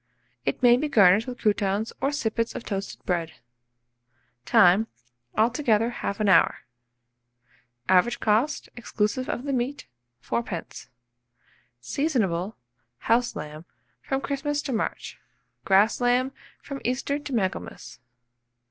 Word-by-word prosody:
It 135 - -2
may 240 0 +7
be 300 +3 -2
garnished 205 -2 +5
with 250 -1 -5
croutons 205 0 0
or 275 - +1
sippets 230 -5 -2
of - - -5
toasted 195 -1 -5
bread. 170 -3 -1 1.1
Time. 185 - +5 0.5
Altogether 230 -1 +2
1/2 205 +1 -1
hour. 185 -4 +4 1.3
Average 190 +6 +3
cost, 225 +8 +1
exclusive 240 +1 -2
of 240 - -3
the 280 -1 -2
meat, 260 +3 -2 0.4
4d. 210 -8 -4 0.9
Seasonable, 205 - -1 0.4
house 235 - +1
lamb, 150 +2 -7 0.4
from 270 0 -2
Christmas 290 +1 -2
to 270 - -3
March; 220 - -3 0.5
grass 205 +5 +4
lamb, 250 +2 +2 0.3
from 275 -1 -7
Easter 260 +4 -1
to 290 - -8
Michaelmas. 190 - -3
230 Hz, 110 wpm, -25 LUFS, 195-260 Hz, 1.3 s, may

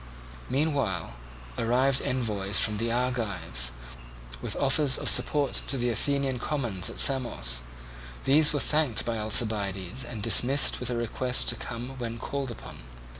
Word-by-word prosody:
Meanwhile 135 - -1 0.5
arrived 130 +3 +2
envoys 105 -6 0
from 105 -1 +2
the 115 0 -1
Argives, 115 - -2 0.7
with - - -4
offers 140 0 +2
of - - -4
support 145 -2 +3
to 135 - 0
the 120 -1 -1
Athenian 135 +1 -1
commons 120 - -2
at - - -8
Samos: 120 - +3 0.6
these 150 +3 +5
were 145 - -1
thanked 150 -6 +1
by 115 -2 -2
Alcibiades, 105 0 0
and 115 -4 -7
dismissed 125 +5 +3
with 125 - -3
a 120 - -2
request 125 +2 +1
to - - +1
come 125 +3 -7
when 115 -1 -5
called 140 +3 -4
upon. 120 - -10
120 Hz, 140 wpm, -27 LUFS, 110-135 Hz, 0.7 s, these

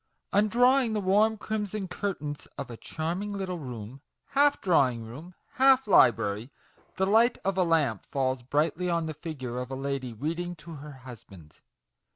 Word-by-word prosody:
Undrawing 240 +4 +4
the 215 - 0
warm 210 +3 +3
crimson 210 -2 -3
curtains 170 -6 -4
of - - -6
a - - -6
charming 170 - -4
little 190 -3 -4
room 125 -2 -8 0.3
half 285 +1 +3
drawing 130 -10 +2
room, 150 +11 -10 0.2
half 265 0 +5
library 115 - +4 0.5
the 190 - +1
light 225 +4 +4
of 195 -1 +1
a 190 - +2
lamp 155 - +1
falls 130 -2 -1
brightly 155 +7 0
on 170 -1 0
the 160 - -4
figure 145 -6 -5
of 125 - -5
a 135 - -4
lady 135 -2 -3
reading 165 +9 -3
to 165 +1 -11
her 150 +1 -9
husband. 115 - -13
160 Hz, 160 wpm, -28 LUFS, 130-200 Hz, 0.5 s, half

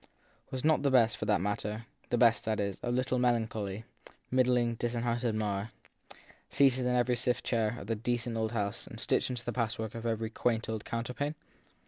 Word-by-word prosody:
Was 130 -1 -4
not 155 0 +4
the 140 - +3
best, 120 -3 +4
for - - -4
that 105 -4 +2
matter, 105 +3 -2 0.2
the 120 - +1
best, 115 -1 +5
that 110 -1 0
is, 100 -2 -2
of 120 0 -1
little 125 0 +1
melancholy, 110 -4 0 0.5
middling, 125 -2 +3
disinherited 120 0 -1
Marr, 105 -1 -1 0.8
seated 130 -2 +3
in 125 - +2
every 125 0 +3
stiff 120 +1 0
chair 115 -1 0
of - - -8
the 115 +2 -1
decent 120 +1 -1
old 110 -1 0
house 100 -3 -2
and - - -9
stitched - - +1
into 125 -2 -4
the 120 - -2
patch 115 -2 -1
work 110 -1 -4
of 115 0 -4
every 110 -1 -1
quaint 115 -1 0
old 110 -1 -4
counterpane? 125 +6 -3
115 Hz, 190 wpm, -31 LUFS, 110-125 Hz, 0.8 s, best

